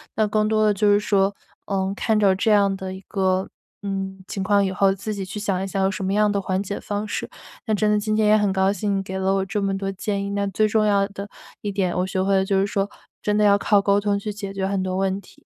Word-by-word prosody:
那 215 - +2
更 215 0 +1
多 215 0 +2
的 210 - +4
就 205 +1 +1
是 205 - +5
说， 200 -1 +1 0.3
嗯， 195 -1 -1
看 215 +2 0
着 200 -2 +4
这 215 +3 +1
样 200 -2 +4
的 190 0 -5
一 190 - -9
个， 190 -1 0 0.3
嗯， 195 -1 -4
情 195 - -3
况 200 0 +3
以 190 - 0
后， 195 +1 +3
自 200 +3 -5
己 195 - -4
去 210 - -6
想 195 -2 -1
一 - - -3
想 195 0 -2
有 190 - +3
什 195 0 -4
么 190 - 0
样 210 0 +3
的 200 - 0
缓 190 0 -1
解 200 0 -4
方 205 +1 -4
式。 - - -4 0.4
那 220 - 0
真 210 +1 +2
的 210 - +3
今 215 +1 -1
天 215 -1 +3
也 215 +1 +6
很 205 -2 +1
高 190 0 +2
兴 200 0 -1
你 - - -1
给 190 0 -5
了 190 0 +1
我 195 - 0
这 200 +2 -2
么 195 0 0
多 195 0 -3
建 200 +1 -3
议， 200 - -4
那 200 0 -1
最 215 +3 +1
重 215 0 +2
要 200 -1 +3
的 200 0 -8 0.3
一 205 - -3
点 190 -3 -1
我 180 - +1
学 190 0 -1
会 195 +1 +2
了 190 - +3
就 195 0 +1
是 195 - +1
说， 200 0 -1 0.3
真 210 0 +1
的 210 - +3
要 200 -1 +6
靠 205 0 +3
沟 200 0 +3
通 205 -1 0
去 210 +1 -4
解 200 -1 -6
决 190 -1 -2
很 195 -1 -1
多 185 0 -2
问 195 0 0
题。 - - -20
200 Hz, 310 characters per minute, -23 LUFS, 190-205 Hz, 0.4 s, 也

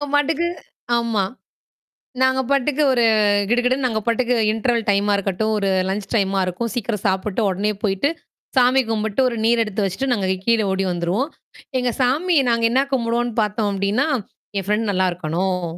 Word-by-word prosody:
பாட்டுக்கு 315 +3 +1 0.5
ஆமா. 230 -4 0 1.0
நாங்க 260 0 +3
பாட்டுக்கு 280 +2 +1
ஒரு 240 -2 +2
அ 215 - +3 0.3
கிடு 240 +1 +3
கிடுன்னு 260 +1 +1
நாங்க 220 -3 -1
பாட்டுக்கு 245 +1 +1 0.2
இன்டர்வல் 230 0 0
டைமா 205 +1 +2
இருக்கட்டும். 200 +3 -1
ஒரு 200 -1 0 0.2
லன்ச் 195 +1 -3
டைமா 195 -2 +1
இருக்கும். 220 +6 -3
சீக்கிரம் 225 -4 -3
சாப்பிட்டு, 190 +3 0
உடனே 200 +3 -1
போயிட்டு, 195 +7 +1 0.5
சாமி 255 +1 +5
கும்பிட்டு, 220 +1 -1
ஒரு 235 - -4
நீர் 230 0 +3
எடுத்து 210 -1 -2
வச்சிட்டு, 255 +8 -2
நாங்க 200 -5 0 0.2
கீழே 230 -2 +3
ஓடி 190 0 -1
வந்துருவோம். 180 - -1 0.5
எங்க 250 -1 0
சாமி 310 +8 +2
நாங்க 230 0 +2
என்னா 265 +3 +3
கும்பிடுவோம்ன்னு 235 -2 0
பாத்தோம் 210 0 -1
அப்படின்னா, 200 +8 0 0.5
"என் 195 - -4
ஃபிரண்டு 210 +1 0
நல்லா 185 -1 +2
இருக்கணும்! 180 +2 -2
225 Hz, 160 wpm, -21 LUFS, 195-250 Hz, 1.0 s, சாமி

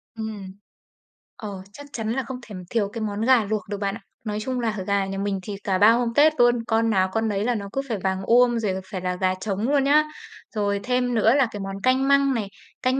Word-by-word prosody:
Ừm. 220 -3 -6 0.9
Ờ, 200 -3 -7
chắc 285 - -10
chắn 220 -1 -2
là 265 +1 -1
không 255 +1 -6
thể 205 - -9
thiếu 210 -4 0
cái 230 - -5
món 210 -1 -3
gà 245 -1 +4
luộc 215 0 -1
được 205 - -3
bạn 200 0 -2
ạ, 225 - -10 0.2
nói 210 -1 -2
chung 255 +3 -2
là 225 -3 -1
gà 200 -1 +1
nhà 195 0 -5
mình 200 0 -1
thì 205 +1 -5
cả 190 -2 +1
3 210 +4 +7
hôm 235 0 +1
Tết 310 +2 +6
luôn, 240 0 +5
con 225 0 +2
nào 190 -3 +2
con 225 0 0
nấy 200 0 -1
là 245 0 +1
nó 200 -2 -5
cứ 270 - 0
phải 225 - -1
vàng 190 0 0
uôm, 240 +1 +4
rồi 210 -4 -1 0.2
phải 185 -3 -4
là 180 0 -2
gà 185 0 0
trống 210 +4 -2
luôn 285 -2 +3
nhá. 295 +2 +5 0.5
Rồi, 200 -1 0
thêm 250 0 0
nữa 225 +3 +4
là 275 -4 +4
cái 205 - -6
món 195 0 -5
canh 260 +1 +3
măng 280 -1 +4
này, 215 -4 -2 0.3
canh 260 +1 +1
220 Hz, 250 wpm, -24 LUFS, 200-245 Hz, 0.9 s, 3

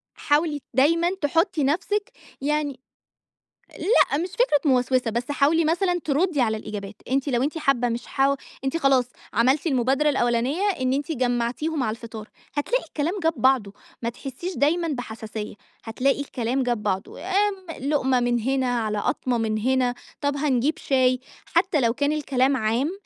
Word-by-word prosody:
حاولي 295 0 +1
دايمًا 335 +6 +3
تحطّي 325 +2 +1
نفسِك 400 +8 0 0.3
يعني 290 -2 -1 1.0
لأ 390 - +3
مش 355 +3 -2
فكرة 370 -8 +2
موسوسة، 250 -1 +2
بس 235 +4 -3
حاولي 295 +3 +3
مثلًا 355 +2 +1
تردي 305 0 +1
على 220 -2 +2
الإجابات، 210 -1 -6 0.2
أنتِ 275 +2 +1
لو 245 -1 +1
أنتِ 300 +4 -1
حابّة 260 -5 +2
مش 235 +1 -4
حاو 275 +1 +2 0.3
أنتِ 270 +5 0
خلاص 275 -5 +3 0.3
عملتِ 260 +8 +2
المبادرة 270 +1 +2
الأولانية 255 +5 +1 0.2
إن 255 0 +1
أنتِ 290 +4 -1
جمَّعتيهم 255 +4 -1
على 220 - 0
الفطار، 225 -2 -9 0.3
هتلاقي 465 +12 0
الكلام 330 +5 -2
جاب 325 0 +3
بعضه، 260 -7 +2 0.3
ما 230 - 0
تحسيش 280 +9 -6
دايمًا 330 +4 +2
بحساسية، 220 -6 -5 0.3
هتلاقي 260 +5 0
الكلام 260 -1 -1
جاب 240 -4 -1
بعضه، 195 -1 -3
آمم، 380 -5 -1
لقمة 265 -4 +2
من 240 -1 +1
هنا، 255 -1 0
على 215 -2 -1
قطمة 245 +3 0
من 220 -1 0
هنا، 250 +2 +1 0.3
طب 285 -1 0
هنجيب 280 0 +1
شاي. 255 -2 +2 0.3
حتى 340 -2 +2
لو 230 -2 +3
كان 285 +3 +1
الكلام 270 -3 +1
عام، 235 +7 0
270 Hz, 155 wpm, -24 LUFS, 245-305 Hz, 1.0 s, دايمًا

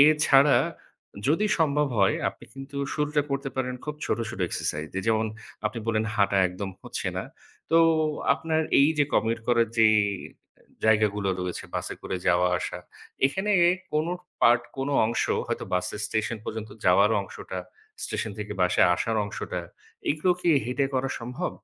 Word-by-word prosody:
এছাড়া 145 -1 +6 0.7
যদি 200 +8 +3
সম্ভব 150 -2 +2
হয়, 95 - +4
আপনি - - -11
কিন্তু 135 +1 -9 0.2
শুরুটা 150 0 +1
করতে 140 0 -2
পারেন 125 -1 -1
খুব 150 0 -4
ছোট, - - 0
ছোট 95 - -7
exercise 75 +1 -3
দিয়ে। 95 +2 -3
যেমন 110 0 +2 0.4
আপনি 110 +2 -4
বললেন 110 -1 +1
হাঁটা 100 -1 +2
একদম 95 +2 -5
হচ্ছে - - -5
না। - - -2 0.5
তো 165 - +4 0.6
আপনার 160 0 -1 0.2
এই 140 +2 +6
যে 145 - +5
commit 115 +1 +2
করার 115 -2 +3
যে 110 -1 +7 1.0
জায়গাগুলো 105 -2 +3
রয়েছে 90 -1 -4
বাসে - - -3
করে 95 - -3
যাওয়া 90 +1 +4
আসা, - - -4 0.5
এখানে 190 +9 -1 0.4
কোন 155 +2 +1 0.3
part 120 0 +5
কোন 135 +1 -2 0.2
অংশ 120 - 0 0.2
হয়তো - - -3
বাসের 90 +3 -2
station 110 +1 -2
পর্যন্ত 110 -1 -5
যাওয়ার 100 +4 +5
অংশটা, 95 -1 -7 0.5
station 110 - -3
থেকে 105 0 -4
বাসায় 90 0 +4
আসার 110 +5 -1
অংশটা, 90 -3 -5 0.5
এগুলো 155 +5 +1
কি 175 - 0 0.2
হেঁটে 130 +3 0
করা 130 +1 0
সম্ভব? 125 +10 -3
115 Hz, 155 wpm, -26 LUFS, 100-145 Hz, 1.0 s, যে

